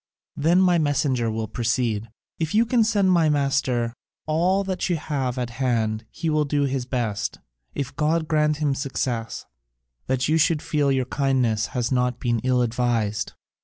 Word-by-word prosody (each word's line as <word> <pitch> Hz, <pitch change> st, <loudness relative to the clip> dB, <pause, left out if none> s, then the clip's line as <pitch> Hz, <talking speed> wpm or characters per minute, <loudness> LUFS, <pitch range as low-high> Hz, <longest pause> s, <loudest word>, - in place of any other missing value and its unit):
"Then 165 Hz, +5 st, +3 dB
my 180 Hz, -2 st, +4 dB
messenger 140 Hz, -5 st, +1 dB
will 110 Hz, 0 st, -3 dB
proceed, 115 Hz, -2 st, -1 dB, 0.3 s
'If 160 Hz, +3 st, -1 dB
you 225 Hz, +2 st, +5 dB
can 235 Hz, -1 st, +3 dB
send 205 Hz, -4 st, +2 dB
my 165 Hz, -3 st, +4 dB
master 135 Hz, -5 st, +1 dB, 0.3 s
all 175 Hz, +5 st, +2 dB
that 190 Hz, -1 st, -2 dB
you 175 Hz, -, +2 dB
have 135 Hz, -5 st, -2 dB
at 120 Hz, -2 st, -3 dB
hand 110 Hz, -3 st, 0 dB
he 165 Hz, 0 st, -5 dB
will 155 Hz, -1 st, +2 dB
do 145 Hz, 0 st, 0 dB
his 135 Hz, -2 st, -2 dB
best, 110 Hz, -5 st, -2 dB, 0.4 s
if 140 Hz, -2 st, -4 dB
God 155 Hz, +1 st, +1 dB
grant 150 Hz, -1 st, +2 dB
him 150 Hz, -2 st, +1 dB
success, 125 Hz, -5 st, -3 dB, 0.6 s
that 130 Hz, 0 st, 0 dB
you 160 Hz, +2 st, +2 dB
should 160 Hz, -1 st, +2 dB
feel 145 Hz, -3 st, +1 dB
your 130 Hz, -1 st, +1 dB
kindness 125 Hz, -5 st, +1 dB
has 120 Hz, 0 st, 0 dB
not 125 Hz, -1 st, +1 dB
been 120 Hz, -2 st, 0 dB
ill 125 Hz, +1 st, +2 dB
advised.' 115 Hz, -3 st, -1 dB
135 Hz, 165 wpm, -24 LUFS, 120-155 Hz, 0.6 s, you